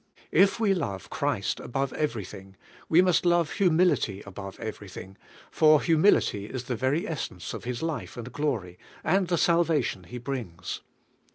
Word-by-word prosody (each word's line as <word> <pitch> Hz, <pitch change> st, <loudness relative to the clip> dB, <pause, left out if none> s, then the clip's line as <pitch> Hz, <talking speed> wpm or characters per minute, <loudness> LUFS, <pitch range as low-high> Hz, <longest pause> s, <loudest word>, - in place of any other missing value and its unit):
If 195 Hz, +5 st, +4 dB
we 210 Hz, -4 st, +3 dB
love 100 Hz, -, -4 dB
Christ -, -, -1 dB
above 135 Hz, +2 st, -2 dB
everything, 100 Hz, -, -4 dB, 0.3 s
we 170 Hz, +3 st, +6 dB
must 180 Hz, -2 st, +3 dB
love 175 Hz, -2 st, +3 dB
humility 175 Hz, -, +2 dB
above 95 Hz, 0 st, -8 dB
everything, 100 Hz, -3 st, -7 dB, 0.4 s
for 155 Hz, -1 st, +6 dB
humility 160 Hz, -, +3 dB
is 125 Hz, +3 st, -5 dB
the 125 Hz, 0 st, -3 dB
very 130 Hz, +7 st, 0 dB
essence 130 Hz, -, -5 dB
of -, -, -7 dB
His 125 Hz, +3 st, -3 dB
life 165 Hz, -5 st, -4 dB
and 120 Hz, +1 st, -7 dB
glory, 115 Hz, -12 st, -2 dB, 0.2 s
and 185 Hz, +3 st, +2 dB
the 175 Hz, 0 st, +1 dB
salvation 165 Hz, -, +2 dB
Fie 125 Hz, -, -8 dB
brings. 115 Hz, -10 st, -5 dB
135 Hz, 150 wpm, -27 LUFS, 100-170 Hz, 0.4 s, we